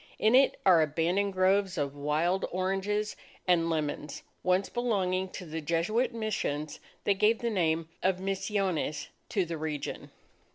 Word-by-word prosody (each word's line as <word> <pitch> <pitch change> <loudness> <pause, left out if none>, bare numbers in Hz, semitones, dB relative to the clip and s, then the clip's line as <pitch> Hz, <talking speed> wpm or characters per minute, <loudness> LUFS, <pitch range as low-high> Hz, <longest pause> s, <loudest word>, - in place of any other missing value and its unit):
In 215 +2 +3
it 270 +2 +5
are 180 -4 +7
abandoned 170 +6 +1
groves 185 0 +2
of 145 -2 -2
wild 155 +6 0
oranges 195 +3 -1 0.3
and 170 -2 +3
lemons, 150 -2 -3 0.2
once 185 +2 +2
belonging 190 -6 0
to 185 - -6
the 160 0 -5
Jesuit 180 - +1
Missions, 200 -10 -3 0.2
that 200 -1 +1
gave 215 +2 +4
the 235 0 -2
name 165 -4 +1
of 185 -1 +2
Misiones 195 -4 -1 0.2
to 195 -4 +1
the 165 -1 -5
region. 150 -2 -4
185 Hz, 140 wpm, -29 LUFS, 160-200 Hz, 0.3 s, are